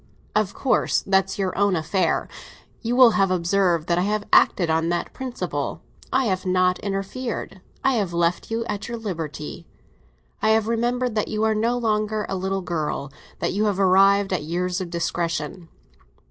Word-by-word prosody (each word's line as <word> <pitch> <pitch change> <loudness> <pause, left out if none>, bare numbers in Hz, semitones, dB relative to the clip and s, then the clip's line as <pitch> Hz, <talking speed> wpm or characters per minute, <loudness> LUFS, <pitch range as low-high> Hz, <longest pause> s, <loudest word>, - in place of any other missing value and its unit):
"Of 210 -2 +1
course; 270 - +1
that's 190 -1 +1
your 190 -2 -1
own 200 -1 +2
affair. 165 +2 0 0.5
You 235 +1 -1
will 250 -2 +8
have 195 -3 +2
observed 175 -2 +1
that 175 0 +2
I 190 +3 0
have 215 0 0
acted 175 - +5
on 160 +1 +1
that 175 0 -2
principle. 260 -2 -4 0.3
I 265 0 +2
have 190 -4 0
not 185 -1 +2
interfered, 195 +1 -4 0.2
I 270 - +3
have 200 -5 -1
left 170 0 0
you 230 +1 -2 0.2
your 235 - -4
liberty, 165 -6 -6 0.7
I - - +2
have 220 -1 -2
remembered 240 +1 0
that 215 -1 0
you 215 0 -2
are 220 0 +3
no 230 +3 +1
longer 215 -2 0
a - - -3
little 190 +1 -2
girl—that 150 -5 -4
you 210 +3 +1
have 200 -2 0
arrived 195 +1 +4
at 175 - 0
years 180 +4 -2
of 180 - -5
discretion." 170 0 -3
195 Hz, 165 wpm, -23 LUFS, 175-215 Hz, 0.7 s, will